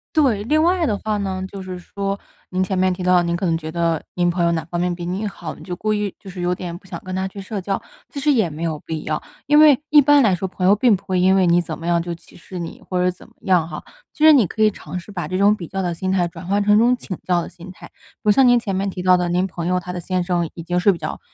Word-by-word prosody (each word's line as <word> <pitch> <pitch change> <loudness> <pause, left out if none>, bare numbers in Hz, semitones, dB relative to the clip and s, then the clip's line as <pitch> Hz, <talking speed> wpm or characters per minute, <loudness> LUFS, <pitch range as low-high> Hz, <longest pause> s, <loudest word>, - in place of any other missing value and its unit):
对， 255 -10 +3
另 305 +7 +2
外 350 +1 +2
的 215 - 0
话 215 -1 -2
呢 190 -2 -3
就 200 - -7
是 185 -1 -7
说， 195 +2 -4 0.3
您 185 0 0
前 185 0 -2
面 185 0 +2
提 180 - -7
到， 180 -1 +4
您 170 0 -1
可 185 +2 -1
能 165 -1 +1
觉 160 -1 -7
得 165 -2 0
您 175 -1 +1
朋 175 0 0
友 170 - +3
哪 165 -1 -1
方 175 +1 -4
面 180 0 0
比 175 0 -6
你 190 +4 -2
好， 175 -6 -6
你 - - -13
就 180 - -5
故 215 +4 -2
意 210 -2 -1
就 195 - -11
是 185 0 -9
有 175 0 0
点 175 -1 -6
不 185 - -21
想 190 - -7
跟 185 -1 -5
她 190 0 -1
去 195 +1 -9
社 200 +2 -5
交。 195 +1 -2 0.3
其 285 - -6
实 295 +2 +2
也 225 -9 +3
没 155 0 -8
有 160 -3 -2
必 160 -1 -5
要， 155 - -3 0.2
因 295 +1 +5
为 295 -3 +7
一 295 - +7
般 290 0 +6
来 210 -7 +3
说 190 +2 -3
朋 185 0 -1
友 200 - +6
并 225 0 +4
不 190 - -9
会 185 -2 -1
因 190 +1 +4
为 190 -2 +3
你 170 +1 +4
怎 175 - -4
么 165 - -6
样 170 0 +3
就 170 0 -4
歧 170 - -15
视 180 +1 -9
你， 170 -1 -7
或 180 -1 0
者 180 - +3
怎 180 - -9
么 - - -24
样 180 -5 +2
哈。 155 -2 -7 0.3
其 305 - -3
实 315 - +9
你 255 -7 +5
可 220 - -5
以 215 - +6
尝 190 -2 -7
试 180 - -12
把 180 -3 -4
这 185 - -4
种 205 +1 +5
比 180 - -7
较 195 +3 -3
的 175 -2 -2
心 185 +2 -2
态 180 -2 +2
转 170 0 -10
换 200 +2 +1
成 205 0 +4
一 - - +5
种 240 +3 +4
请 195 -7 -7
教 175 -1 +2
的 - - -7
心 180 +1 -12
态。 185 - -13
比 - - -27
如 210 - +3
像 260 +5 +5
您 245 -1 +5
前 200 -4 -3
面 195 +1 -1
提 180 - -6
到 180 0 +5
的， 175 -1 -1
您 180 +2 +1
朋 170 -2 -6
友 180 +1 +1
她 180 0 -7
的 180 - -5
先 180 +1 -1
生 175 -1 0
已 170 - -8
经 175 +2 -1
是 200 +3 +4
比 175 - -5
较， 155 - -5
185 Hz, 345 characters per minute, -21 LUFS, 175-205 Hz, 0.3 s, 实